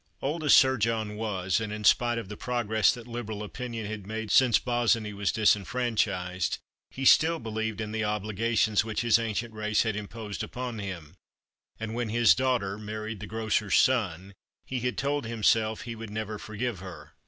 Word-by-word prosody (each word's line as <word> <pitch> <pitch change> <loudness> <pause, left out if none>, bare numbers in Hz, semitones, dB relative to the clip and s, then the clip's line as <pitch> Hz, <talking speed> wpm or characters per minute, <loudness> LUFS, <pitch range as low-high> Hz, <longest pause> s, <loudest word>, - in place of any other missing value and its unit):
Old 155 +4 -2
as 150 - +7
Sir 130 -1 +5
John 110 -1 -1
was, 105 -2 -1
and 110 -1 -4
in 105 0 -5
spite 120 +3 +4
of 115 - -4
the 105 - -7
progress 110 -3 +1
that 120 -2 -8
Liberal 115 -3 -5
opinion 115 0 -5
had 105 -2 -6
made 110 -1 -4
since 125 -1 +6
Bossiny 120 -3 +1
was 100 -1 0
disfranchised, 105 -4 +1 0.3
he 135 - -5
still 160 +5 +6
believed 110 -2 -3
in 110 -1 -4
the 110 0 -1
obligations 105 +1 +1
which 110 -1 -2
his 115 -1 +4
ancient 115 0 -3
race 110 0 +1
had 110 -2 -1
imposed 105 0 -6
upon 125 -3 -5
him; 90 -6 -6 0.7
and 110 0 -4
when 120 -1 -2
his 115 +1 +5
daughter 120 -6 0
married 110 0 -5
the 105 - -7
grocer's 110 -1 0
son, 100 -7 +1 0.3
he 130 - -3
had 125 +1 -2
told 140 -2 -1
himself 110 -1 +1
that - - -9
he 115 -1 -5
would 115 -1 -8
never 110 0 -4
forgive 110 0 -4
her. 85 -4 -10
110 Hz, 180 wpm, -28 LUFS, 105-120 Hz, 0.7 s, as